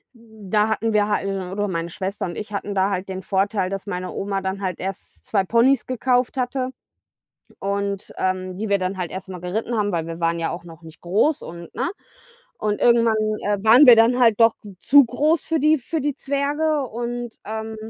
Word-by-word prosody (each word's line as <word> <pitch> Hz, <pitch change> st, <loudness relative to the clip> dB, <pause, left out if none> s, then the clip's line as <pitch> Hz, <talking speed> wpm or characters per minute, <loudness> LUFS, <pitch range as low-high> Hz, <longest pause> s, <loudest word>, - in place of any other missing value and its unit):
hm, 220 Hz, -4 st, -15 dB
da 215 Hz, 0 st, +3 dB
hatten 220 Hz, 0 st, 0 dB
wir 205 Hz, 0 st, +3 dB
halt 205 Hz, -, 0 dB
o 190 Hz, -2 st, -3 dB
oder 205 Hz, +1 st, -1 dB
meine 170 Hz, -2 st, -3 dB
Schwester 190 Hz, +3 st, -4 dB
und 175 Hz, -2 st, -5 dB
ich 210 Hz, -1 st, -7 dB
hatten 200 Hz, 0 st, -3 dB
da 190 Hz, +1 st, +2 dB
halt 190 Hz, 0 st, -3 dB
den 190 Hz, -1 st, -5 dB
Vorteil, 195 Hz, 0 st, 0 dB
dass 195 Hz, +1 st, -5 dB
meine 180 Hz, -1 st, -4 dB
Oma 195 Hz, 0 st, -2 dB
dann 190 Hz, +1 st, -3 dB
halt 185 Hz, -3 st, -3 dB
erst 195 Hz, +1 st, -7 dB
2 195 Hz, -3 st, +1 dB
Ponys 235 Hz, +5 st, +3 dB
gekauft 250 Hz, 0 st, 0 dB
hatte 255 Hz, 0 st, -1 dB, 0.9 s
und, 200 Hz, 0 st, -3 dB
ähm 185 Hz, 0 st, -2 dB
die 220 Hz, 0 st, -3 dB
wir 200 Hz, 0 st, +2 dB
dann 185 Hz, +1 st, -2 dB
halt 175 Hz, -2 st, -3 dB
erst 190 Hz, +1 st, -7 dB
mal 180 Hz, -2 st, -7 dB
geritten 215 Hz, +7 st, -3 dB
haben, 205 Hz, -1 st, +1 dB
weil 165 Hz, -1 st, -1 dB
wir 165 Hz, +1 st, -7 dB
waren 170 Hz, 0 st, +1 dB
ja 165 Hz, -, -1 dB
auch 170 Hz, -, -7 dB
noch 165 Hz, -1 st, -13 dB
nicht 160 Hz, 0 st, -14 dB
groß 220 Hz, -, +1 dB
und 170 Hz, 0 st, -10 dB
ne? 255 Hz, +4 st, -1 dB, 0.7 s
Und 210 Hz, -1 st, -1 dB
irgendwann, 235 Hz, -2 st, +4 dB, 0.3 s
äh, 205 Hz, 0 st, +1 dB
waren 240 Hz, +6 st, +8 dB
wir 245 Hz, -2 st, +10 dB
dann 240 Hz, +3 st, +4 dB
halt 225 Hz, -3 st, +4 dB
doch 230 Hz, -1 st, +5 dB, 0.3 s
zu 285 Hz, +1 st, +7 dB
groß 300 Hz, +7 st, +1 dB
für 325 Hz, -, 0 dB
die 305 Hz, +1 st, +4 dB
für 315 Hz, +5 st, -3 dB
die 290 Hz, 0 st, -1 dB
Zwerge 285 Hz, +2 st, 0 dB
und, 240 Hz, +1 st, -4 dB
ähm 220 Hz, +1 st, -5 dB
205 Hz, 210 wpm, -22 LUFS, 185-240 Hz, 0.9 s, wir